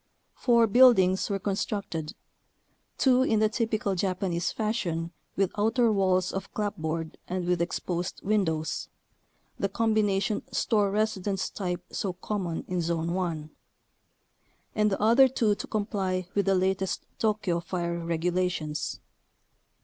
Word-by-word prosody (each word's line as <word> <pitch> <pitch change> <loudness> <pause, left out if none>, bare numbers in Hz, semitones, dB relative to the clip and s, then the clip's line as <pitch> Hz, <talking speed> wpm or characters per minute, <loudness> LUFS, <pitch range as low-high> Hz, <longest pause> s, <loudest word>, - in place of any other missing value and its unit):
Four 235 -2 +4
buildings 205 -5 +5
were 200 - 0
constructed: 195 -5 -3 0.8
two 255 -1 +4
in 230 -4 +2
the 215 0 +3
"typical 215 -3 -1
Japanese 185 -2 -1
fashion" 175 -7 -2 0.2
with 195 -1 +1
outer 225 +3 +3
walls 185 -3 +2
of 195 - -5
clapboard 165 -6 -3
and 180 0 -2
with 175 -1 +1
exposed 175 +1 -2
windows 170 -7 0 0.7
(the 195 - 0
combination 210 -1 +1
store 210 -4 +2
residence 200 -2 -1
type 180 -3 -3
so 190 -3 -2
common 180 -2 -3
in 180 -1 -1
Zone 165 0 -1
1); 165 -4 -3 1.2
and 210 -1 +2
the 195 - -1
other 235 +5 +6
two 230 -5 +1
to - - -6
comply 195 -4 -1
with 200 -1 +1
the 195 - +4
latest 190 +1 0
Tokyo 210 -6 +1
fire 170 0 -3
regulations. 170 -2 -1
195 Hz, 125 wpm, -28 LUFS, 175-215 Hz, 1.2 s, other